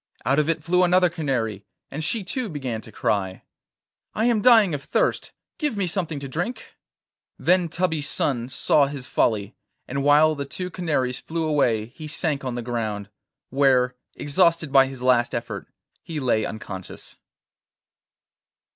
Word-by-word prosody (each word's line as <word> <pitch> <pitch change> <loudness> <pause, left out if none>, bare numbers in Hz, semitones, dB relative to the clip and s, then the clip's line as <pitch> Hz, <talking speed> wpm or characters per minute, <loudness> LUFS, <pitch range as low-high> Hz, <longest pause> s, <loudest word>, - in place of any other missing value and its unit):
Out 140 +5 +3
of 150 +1 +1
it 165 -2 0
flew 180 +2 +3
another 180 0 +4
canary, 120 - -2 0.3
and 155 +3 -4
she 210 +7 -1
too 235 +4 -3
began 130 -8 -4
to 110 - -14
cry: 95 -3 -1 0.7
'I 220 - +1
am 235 -3 +2
dying 220 -7 +6
of 140 -1 -4
thirst; - - 0 0.3
give 295 -9 -1
me 200 - +1
something 165 -4 -2
to 140 - -5
drink.' 175 - -5 0.6
Then 180 -2 +2
Tubby's 160 -4 0
son 120 -3 0
saw 140 +2 +3
his 140 -2 -7
folly, 105 -2 0 0.3
and 140 +2 -2
while 150 +2 +5
the 140 -2 -4
two 180 +7 -5
canaries 145 -8 -1
flew 165 0 -3
away 120 -8 +2
he 140 +7 -10
sank 150 -1 -2
on 130 -2 -3
the 120 - -4
ground, 110 -4 -3 0.4
where, 130 -2 +3 0.2
exhausted 165 0 +2
by 135 -1 +6
his 130 -2 -8
last 125 -2 +3
effort, - - -5 0.3
he 160 -2 -5
lay 120 -5 +1
unconscious. 95 -4 -8
145 Hz, 155 wpm, -24 LUFS, 125-170 Hz, 0.7 s, dying